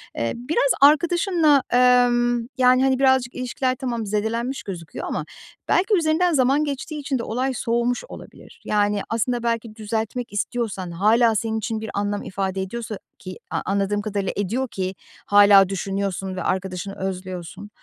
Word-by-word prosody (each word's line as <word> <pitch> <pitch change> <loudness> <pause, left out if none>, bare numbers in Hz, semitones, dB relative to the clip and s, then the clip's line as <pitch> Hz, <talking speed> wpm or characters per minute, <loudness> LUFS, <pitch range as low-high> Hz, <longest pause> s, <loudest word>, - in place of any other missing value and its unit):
Eee, 115 0 -1
biraz 270 +3 0
arkadaşınla, 325 0 +4
emm, 240 -1 +3
yani, 255 0 +4
hani, 265 -1 +2
birazcık 260 -2 +2
ilişkiler 255 +1 -1
tamam 235 -3 -3
zedelenmiş 225 +5 -2
gözüküyor 170 -5 -7
ama - - -3 0.4
belki 390 +4 +2
üzerinden 335 +2 +2
zaman 275 +1 +3
geçtiği 295 +1 -4
için 275 -2 -2
de - - -3
olay 255 +4 -1
soğumuş 240 0 -1
olabilir. - - -13
Yani, 205 -1 +1
aslında 235 +1 -1
belki 230 -2 -2
düzeltmek 220 +2 -4
istiyorsan 205 -4 -3
hâlâ 220 +6 +3
senin 220 +1 -1
için 220 0 -3
bir 220 - -5
anlam 205 0 -2
ifade 190 0 -3
ediyorsa 215 +2 -5 0.2
ki 185 -1 -8 0.3
anladığım 200 +1 0
kadarıyla 205 -2 -2
ediyor 230 +7 -1
ki 190 -5 -4 0.3
hâlâ 200 -2 +6
düşünüyorsun 195 -1 -3
ve 185 - -4
arkadaşını 190 +1 -3
özlüyorsun. 185 +1 -6
230 Hz, 145 wpm, -22 LUFS, 200-255 Hz, 0.4 s, hâlâ